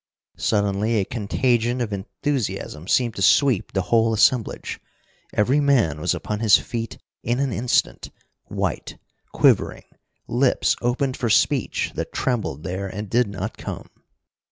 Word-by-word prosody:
Suddenly 105 0 +1
a 95 - 0
contagion 120 +2 0
of 115 -4 -2
enthusiasm 100 - -3
seemed 120 0 +2
to - - -4
sweep 130 0 +3
the 95 - -1
whole 115 -1 +4
assemblage. 115 +1 +1 0.5
Every 125 +8 +2
man 120 - +2
was - - +1
upon 105 -1 -4
his 110 -3 +6
feet 115 -2 -5 0.2
in 120 +2 -1
an 135 -3 0
instant, 120 +3 0 0.4
white, - - -3 0.3
quivering, - - +2 0.4
lips 125 +2 +2
opened 130 +2 0
for 120 - -1
speech 110 - +1
that - - -4
trembled 110 - -2
there 95 +2 -4
and 105 +1 -7
did 120 0 +3
not 100 -1 -6
come. - - -7
115 Hz, 135 wpm, -23 LUFS, 100-125 Hz, 0.5 s, his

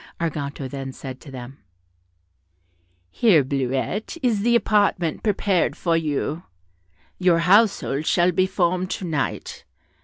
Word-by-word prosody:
Arganto 145 -4 -3
then 135 0 -6
said 130 0 -9
to 150 - -12
them, 130 0 -9 1.5
"Here, 185 -11 +4
Bleuette, 135 - -2
is 235 -5 +2
the 235 +3 +3
apartment 205 -7 +1
prepared 200 -4 +1
for 170 -2 0
you; 155 0 -1 0.8
your 180 -2 +4
household 180 -5 +3
shall 175 0 +3
be 185 +2 +2
formed 185 -1 0
to 190 - -4
night. 155 -5 -3
170 Hz, 120 wpm, -23 LUFS, 140-195 Hz, 1.5 s, Here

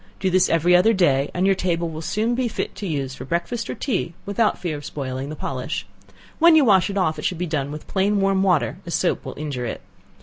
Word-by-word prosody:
Do 185 - 0
this 185 0 +3
every 165 +2 +4
other 220 +6 +5
day 145 -8 +2
and 180 +1 0
your 195 - +5
table 175 -2 -1
will 160 -1 -6
soon 220 +8 0
be 250 0 0
fit 225 - -4
to 200 - -4
use 140 -5 -2
for 130 - -8
breakfast 175 - -2
or - - -3
tea 195 - -2
without 205 +2 +1
fear 170 -4 -3
of 145 - -8
spoiling 135 -2 -5
the 155 - -5
polish; 135 0 -4 0.5
when 335 0 +7
you 305 -3 +6
wash 195 -5 +4
it 200 - -3
off 160 -5 +1
it - - -7
should 180 - 0
be 180 - -2
done 145 -4 -2
with 150 +1 -7
plain 200 +1 +1
warm 195 -1 +2
water, 185 -3 +1
as 170 - -1
soap 180 - 0
will - - -8
injure 140 -5 -4
it. - - -5
175 Hz, 245 wpm, -22 LUFS, 150-195 Hz, 0.5 s, when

